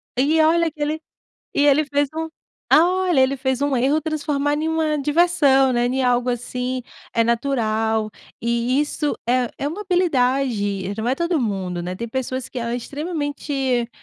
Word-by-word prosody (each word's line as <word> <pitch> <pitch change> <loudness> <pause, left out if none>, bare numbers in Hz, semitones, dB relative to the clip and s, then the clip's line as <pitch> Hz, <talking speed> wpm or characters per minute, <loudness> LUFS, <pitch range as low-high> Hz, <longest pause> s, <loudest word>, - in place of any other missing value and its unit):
E 295 +5 +2
olha 330 +1 +3
que 300 -1 -12
ele 310 +2 -1 0.5
e 290 - +3
ele 295 +2 +4
fez 285 0 0
um 320 0 -3 0.4
olha, 355 -1 +4
ele 265 +1 +3
fez 265 0 -1
um 285 -2 +1
erro 275 +6 +2
transformar 295 -2 -1
em 310 +2 -1
uma 320 -1 0
diversão, 285 -3 +3
né, 240 0 +1
em 260 +1 0
algo 245 0 +2
assim, 250 +1 -3 0.3
eh, 230 -1 +2
natural, 225 -3 0 0.3
e 235 +3 0
isso 295 0 -1
é 250 -1 +2
é 280 - -2
uma 340 +8 -4
habilidade, 255 - 0
não 220 +2 -2
é 260 - +2
todo 340 -3 0
mundo, 185 -6 -2
né, 180 +1 -4
tem 235 - -4
pessoas 260 +1 -3
que 255 - -6
ela 235 0 -3
é - - 0
extremamente, 280 -4 -2
270 Hz, 170 wpm, -21 LUFS, 240-305 Hz, 0.5 s, ele